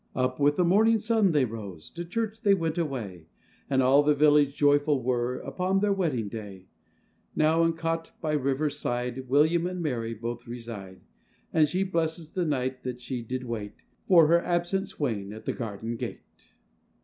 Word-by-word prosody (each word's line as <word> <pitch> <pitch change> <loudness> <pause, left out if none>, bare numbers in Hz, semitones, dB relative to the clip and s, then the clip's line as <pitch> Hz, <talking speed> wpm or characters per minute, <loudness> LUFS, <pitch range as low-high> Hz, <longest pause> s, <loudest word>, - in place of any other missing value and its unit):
Up 130 +1 0
with 145 +1 +3
the 180 - +2
morning 220 +6 +4
sun 220 -3 +2
they 145 -4 +3
rose, 100 -8 -8
To 170 - -6
church 220 +4 -3
they 200 -4 +4
went 165 -2 -2
away, 110 - -4 0.4
And 130 -1 +3
all 135 +3 +6
the 150 0 +3
village 145 -1 +4
joyful 145 -2 +3
were, 125 0 0
Upon 190 +1 -1
their 205 0 +2
wedding 150 - -1
day: 100 -3 -8 0.7
Now 160 +2 +3
in - - +3
a - - -1
cot, 165 0 -3
by 155 -3 -2
a - - +3
river 135 +3 0
side, 125 -2 -3
William 160 +5 +3
and 180 0 -4
Mary 115 -8 -2
both 120 +2 -6
reside; 115 -6 -8 0.5
And 155 -2 +4
she 185 +6 0
blesses 165 -3 -2
the 180 -2 -1
night 130 -3 -1
that 125 -1 -5
she 125 0 -5
did 125 +3 -4
wait 110 -4 -6 0.2
For 170 -4 +7
her 170 +2 +4
absent 175 +2 -1
swain, 105 -8 -3
at 110 - -10
the - - -1
garden 115 0 -5
gate. - - -6
145 Hz, 185 wpm, -27 LUFS, 120-170 Hz, 0.7 s, For